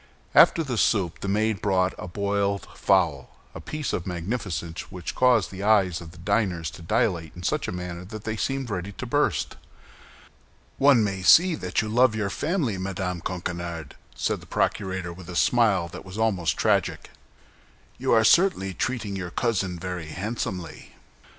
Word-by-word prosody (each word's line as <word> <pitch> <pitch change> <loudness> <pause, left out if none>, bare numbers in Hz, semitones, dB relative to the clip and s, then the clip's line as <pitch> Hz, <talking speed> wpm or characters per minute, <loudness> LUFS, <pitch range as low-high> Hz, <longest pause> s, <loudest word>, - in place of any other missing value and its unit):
After 165 - +6
the 125 -6 -2
soup 95 -7 +1
the - - -5
maid 105 +1 0
brought 95 -2 +2
a - - -6
boiled 100 +1 -1
fowl—a 80 -9 0
piece 155 -2 -4
of 85 - -3
magnificence 90 -2 -4
which 90 -2 -5
caused 125 -6 +3
the 95 0 -7
eyes 100 -5 +3
of 85 - -9
the 85 - -15
diners 90 -3 0
to - - -12
dilate 85 -4 0
in 90 - -9
such - - 0
a - - -2
manner 90 -1 -5
that 110 +2 -8
they 110 0 -3
seemed 135 +1 -2
ready 95 +1 -4
to - - -6
burst. - - 0 1.2
"One 135 -5 +6
may 100 -2 -2
see 175 - +6
that 95 - -1
you - - -4
love 120 +1 +3
your 100 -2 -1
family, 145 - -1
Madame 90 -2 -3
Coquenard," 85 -3 -5 0.2
said - - -1
the - - -15
procurator, 95 -3 -1
with 90 0 -12
a 90 - -6
smile 105 -5 +3
that - - -9
was 95 +2 -9
almost 105 -7 +1
tragic. - - 0 0.9
"You - - 0
are 110 -1 +5
certainly 110 - +4
treating 110 0 -2
your 90 -2 -4
cousin 95 -4 -1
very 90 -2 -5
handsomely!" 90 -2 -5
95 Hz, 165 wpm, -25 LUFS, 90-110 Hz, 1.2 s, After